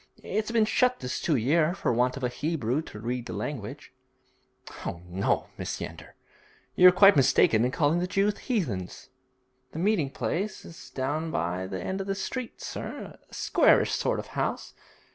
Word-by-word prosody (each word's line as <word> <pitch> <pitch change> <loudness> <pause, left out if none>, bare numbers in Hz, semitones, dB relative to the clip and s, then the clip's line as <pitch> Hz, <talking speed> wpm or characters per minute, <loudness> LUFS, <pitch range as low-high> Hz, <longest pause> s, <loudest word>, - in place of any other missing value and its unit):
It's 215 +1 -2
been 230 -2 +3
shut 250 +3 +2
this 125 +1 -4
two 160 - +1
year, 155 +8 +2
for 160 - 0
want 125 +3 +1
of 135 - -7
a - - +3
Hebrew 140 0 -1
to 155 - -11
read 120 +2 -3
the - - -5
language.' 125 -9 -6 0.9
'Oh, 85 - -4
no, 95 +3 -1
Mrs. - - -4
Yeander; - - -8 0.6
you're 180 0 +9
quite 195 +2 +7
mistaken 135 -5 +4
in 125 - +2
calling 150 +4 +2
the 180 - -1
Jews 200 +2 +1
heathens.' 125 - -3 0.6
'The - - -7
meeting 180 -5 +1
place 190 +8 -3
is 165 - -12
down 145 +5 -2
by 90 - -2
the 95 -1 -4
end 190 +1 -2
of 195 - -6
the 195 - -1
street, 240 +5 -5
sir - - -7
a - - -29
squarish - - +3
sort - - 0
of - - -5
house. - - -2
155 Hz, 175 wpm, -27 LUFS, 125-195 Hz, 0.9 s, you're